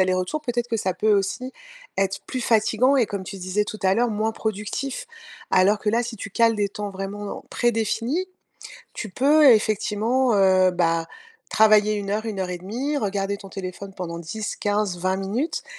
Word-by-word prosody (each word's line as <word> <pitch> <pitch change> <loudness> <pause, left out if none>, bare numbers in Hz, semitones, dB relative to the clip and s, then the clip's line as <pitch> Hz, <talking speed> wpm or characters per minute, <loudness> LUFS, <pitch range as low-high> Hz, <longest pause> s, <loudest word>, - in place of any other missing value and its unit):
allers-retours, 185 +9 +1
peut-être 240 -3 -2
que 225 - -1
ça 185 -2 -1
peut 215 +3 +2
aussi 205 +6 -1 0.5
être 195 0 0
plus 255 - -3
fatiguant 235 +4 +3
et 245 - +4
comme 200 -2 -5
tu 195 +1 -7
disais 185 +3 -1
tout 215 - -6
à 190 0 +3
l'heure, 240 +2 +2
moins 215 +1 -1
productif? 220 +5 -4 0.4
Alors 200 +3 +4
que 210 - 0
là, 235 +2 +2
si 235 -1 -6
tu 200 0 -7
cales 230 +1 +3
des 200 -1 0
temps 210 -1 -5
vraiment 200 +1 -6
prédéfinis, 240 - 0 0.7
tu 215 - -6
peux 290 +8 +4
effectivement, 225 +3 +2
heu 185 -1 +5
bah, 165 -2 +1 0.4
travailler 215 -1 +5
1 200 -1 -3
heure, 215 +2 -1
1 210 -3 -4
heure 185 -1 -2
et 180 - -4
demie, 255 +11 -2
regarder 200 -2 -1
ton 195 -1 -12
téléphone 190 +1 -7
pendant 170 -2 -5
10-15-20 200 -1 -2
minutes 230 - -2
210 Hz, 175 wpm, -23 LUFS, 195-230 Hz, 0.7 s, heu